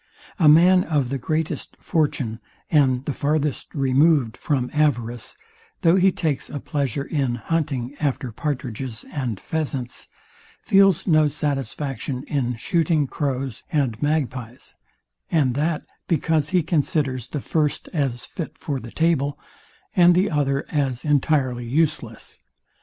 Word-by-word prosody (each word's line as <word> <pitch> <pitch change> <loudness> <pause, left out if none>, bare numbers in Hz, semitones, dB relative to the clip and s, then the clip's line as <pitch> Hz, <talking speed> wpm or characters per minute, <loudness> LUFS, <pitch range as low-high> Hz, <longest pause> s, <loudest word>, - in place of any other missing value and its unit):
A 160 -4 +6
man 180 +4 +6
of 145 -6 0
the 135 0 -2
greatest 155 +4 -3
fortune, 135 -8 -1 0.3
and 135 -4 +3
the 145 - -1
farthest 150 +1 -1
removed 135 -2 +3
from 130 -5 -1
avarice, 120 - 0 0.4
though 170 -2 +5
he 190 0 +5
takes 155 -7 -2
a 145 - -4
pleasure 140 -2 -2
in 140 -5 -1
hunting 140 -2 -2
after 135 -4 -1
patridges 130 -3 -4
and 125 -9 -3
pheasants, 135 -6 -3 0.6
feels 195 -2 +4
no 155 -3 +4
satisfaction 135 -2 -3
in 125 -4 -1
shooting 155 +4 +1
crows 135 -3 -3
and 130 -8 0
magpies; 130 -5 -2 0.6
and 145 -7 +2
that 150 +4 0 0.2
because 160 -2 +1
he 180 -1 +2
considers 145 -6 0
the 150 - -4
first 150 +1 0
as 135 -7 -1
fit 165 - -7
for 140 -3 -3
the 120 - -9
table, 145 -1 +1 0.6
and 175 -1 +6
the 185 0 +2
other 140 -2 0
as 135 -5 -1
entirely 135 -4 +1
useless. 135 -5 -1
145 Hz, 130 wpm, -23 LUFS, 130-155 Hz, 0.6 s, A